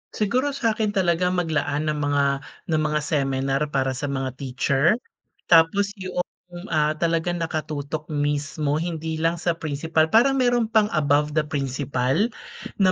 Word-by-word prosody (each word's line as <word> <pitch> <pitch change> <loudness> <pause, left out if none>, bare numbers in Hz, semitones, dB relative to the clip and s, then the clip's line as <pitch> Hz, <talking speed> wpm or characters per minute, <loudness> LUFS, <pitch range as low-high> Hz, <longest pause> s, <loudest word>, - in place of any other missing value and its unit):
Siguro 255 +7 0
sa'kin 220 -5 0
talaga 180 -2 +2
maglaan 155 -4 0
ng 150 - -3
mga 145 -1 +1 0.5
ng 155 -1 +2
mga 150 0 0
seminar 135 -2 0
para 135 -2 0
sa 130 +2 -4
mga 135 -1 -2
teacher. 135 +6 +2 0.6
Tapos 175 +5 +5
'yong, 185 -1 -2 0.5
ah, 155 -1 +2
talagang 170 +2 0
nakatutok 155 -1 -4
mismo 145 0 -1
hindi 160 -1 -3
lang 165 +1 +1
sa 170 +1 0
principal. 160 +1 0
Parang 265 +9 +4
meron 245 -3 +2
pang 215 -2 +4
above 150 0 +2
the 155 - +3
principal 140 - -1 0.5
na 190 -2 +5
155 Hz, 140 wpm, -23 LUFS, 145-180 Hz, 0.6 s, Tapos